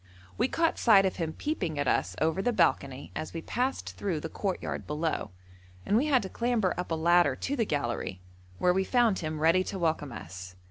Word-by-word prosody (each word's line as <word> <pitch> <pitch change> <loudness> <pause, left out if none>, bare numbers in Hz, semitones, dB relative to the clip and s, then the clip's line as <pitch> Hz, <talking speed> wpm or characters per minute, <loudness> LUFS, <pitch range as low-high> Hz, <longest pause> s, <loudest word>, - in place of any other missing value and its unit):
We 240 - +2
caught 330 +4 +1
sight 200 -5 +6
of 190 - -1
him 165 -2 -2
peeping 185 - -3
at 145 - 0
us - - +1
over 160 +4 +1
the 245 - +1
balcony 140 - 0
as 155 - -5
we 165 - -4
passed 255 +3 -2
through 180 -6 -1
the 160 - -5
courtyard 195 +1 -3
below, 155 +2 -2 0.6
and 205 - +1
we 265 +7 +3
had 260 -6 +3
to - - -4
clamber 235 -5 0
up 180 +1 -4
a 165 - 0
ladder 170 -3 +4
to 280 - -3
the 230 -5 +1
gallery, 120 - -2 0.4
where 180 - +3
we 190 +1 +1
found 235 -2 +2
him 155 -1 -4
ready 165 +4 +4
to 195 - -4
welcome 160 -5 -1
us. 90 -3 -9
175 Hz, 205 wpm, -29 LUFS, 155-220 Hz, 0.6 s, sight